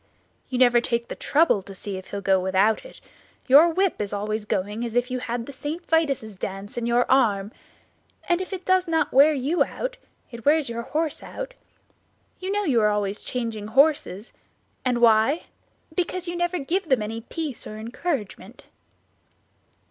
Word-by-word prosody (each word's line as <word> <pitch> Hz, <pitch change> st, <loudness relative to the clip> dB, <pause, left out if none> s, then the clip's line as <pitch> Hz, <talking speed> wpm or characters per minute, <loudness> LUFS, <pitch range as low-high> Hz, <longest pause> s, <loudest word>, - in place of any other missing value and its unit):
"You 255 Hz, -, -2 dB
never 245 Hz, -1 st, +5 dB
take 235 Hz, -1 st, -2 dB
the -, -, -5 dB
trouble 295 Hz, -8 st, +2 dB
to 195 Hz, +1 st, -11 dB
see 200 Hz, +1 st, -5 dB
if 185 Hz, 0 st, -8 dB
he -, -, -7 dB
will 200 Hz, -, -3 dB
go 190 Hz, -1 st, +3 dB
without 190 Hz, +4 st, +2 dB
it; -, -, -13 dB, 0.5 s
your 290 Hz, +6 st, +7 dB
whip 375 Hz, -, 0 dB
is 205 Hz, -, -3 dB
always 210 Hz, +1 st, -2 dB
going 210 Hz, +2 st, -2 dB
as 235 Hz, -1 st, -4 dB
if 245 Hz, +1 st, +1 dB
you 255 Hz, -, -1 dB
had 240 Hz, -1 st, -3 dB
the 280 Hz, -, -9 dB
St. 300 Hz, +6 st, -5 dB
Vitus' 275 Hz, -10 st, 0 dB
dance 195 Hz, +2 st, -6 dB
in 235 Hz, -1 st, -2 dB
your 240 Hz, +1 st, +3 dB
arm, 215 Hz, -6 st, +2 dB, 0.8 s
and 350 Hz, +1 st, +2 dB
if 375 Hz, -, -6 dB
it 375 Hz, -1 st, -6 dB
does 370 Hz, -1 st, +3 dB
not 325 Hz, -1 st, 0 dB
wear 280 Hz, +4 st, +7 dB
you 295 Hz, +4 st, +1 dB
out -, -, -5 dB, 0.3 s
it 235 Hz, -1 st, -9 dB
wears 300 Hz, 0 st, +3 dB
your 235 Hz, 0 st, -3 dB
horse 305 Hz, +5 st, -2 dB
out; -, -, -7 dB, 0.9 s
you 375 Hz, +1 st, -3 dB
know 415 Hz, +1 st, 0 dB
you 260 Hz, -, +2 dB
are 210 Hz, -, +4 dB
always 205 Hz, -1 st, -1 dB
changing 230 Hz, -4 st, -4 dB
your 215 Hz, -, -10 dB
horses; 270 Hz, -7 st, +2 dB, 0.5 s
and 245 Hz, -2 st, 0 dB
why? 230 Hz, +7 st, +4 dB, 0.5 s
Because 360 Hz, 0 st, -2 dB
you 345 Hz, -, -3 dB
never 350 Hz, +1 st, 0 dB
give 340 Hz, +4 st, -2 dB
them 255 Hz, -5 st, +3 dB
any 225 Hz, +2 st, -5 dB
peace 295 Hz, +2 st, -5 dB
or 215 Hz, -, -8 dB
encouragement." 225 Hz, -, -5 dB
245 Hz, 185 wpm, -24 LUFS, 215-320 Hz, 0.9 s, your